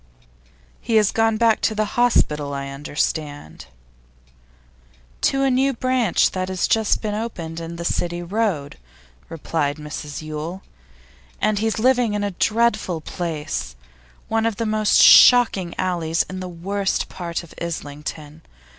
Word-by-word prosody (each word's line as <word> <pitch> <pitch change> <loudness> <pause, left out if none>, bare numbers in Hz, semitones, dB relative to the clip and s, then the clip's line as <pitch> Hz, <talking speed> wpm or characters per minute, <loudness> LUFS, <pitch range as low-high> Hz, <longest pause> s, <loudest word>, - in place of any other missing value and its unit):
'He 230 - -2
has 210 -2 +4
gone 225 -1 +1
back 230 -1 +3
to 220 - 0
the 215 0 +1
hospital, 150 -12 +1
I 140 0 -5
understand 145 - -4 0.7
' - - -32
'To 270 0 +2
a 270 - +2
new 270 +2 +2
branch 255 -5 +1
that 185 0 -3
has 185 -1 0
just 220 0 +1
been 210 -1 -2
opened 175 -7 -5
in 165 0 -7
the 170 0 -6
City 175 0 -1
Road,' 180 - -2 0.5
replied 155 -2 -2
Mrs 150 0 -7
Yule. 155 +4 -6 0.8
'And 215 -1 +1
he's 220 0 -1
living 245 -2 +2
in 205 - -1
a 205 - -1
dreadful 215 -3 0
place 155 - -4 0.5
one 225 0 +1
of 225 - -2
the 230 - -3
most 215 -1 +2
shocking 220 -8 +7
alleys 170 -3 0
in 185 0 -6
the 185 -1 -6
worst 195 +3 -2
part 170 -1 -5
of 170 - -14
Islington. 150 -1 -6
175 Hz, 145 wpm, -21 LUFS, 150-220 Hz, 0.8 s, shocking